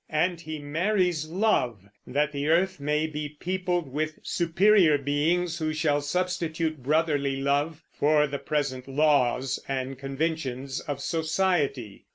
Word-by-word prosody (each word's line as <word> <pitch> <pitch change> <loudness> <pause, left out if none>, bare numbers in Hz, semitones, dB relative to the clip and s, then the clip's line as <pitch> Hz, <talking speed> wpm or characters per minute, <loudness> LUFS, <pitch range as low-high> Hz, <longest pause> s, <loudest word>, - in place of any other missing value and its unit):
And 170 +2 0
he 155 -1 -5
marries 165 +2 0
Love 145 - 0 0.2
that 145 +3 0
the 145 0 -3
earth 180 +2 +2
may 150 +2 0
be 150 -1 -5
peopled 180 -3 -1
with 155 +3 -3
superior 175 -1 +4
beings 160 +5 0
who 155 -1 -1
shall 155 -2 +1
substitute 165 -1 -2
brotherly 145 -1 +1
love 145 +3 0
for 150 0 +3
the 140 -1 -4
present 135 -4 -2
laws 135 -2 +2
and 135 -1 -3
conventions 135 -2 -3
of 140 -2 -5
society. 160 - -1
150 Hz, 130 wpm, -27 LUFS, 140-165 Hz, 0.2 s, superior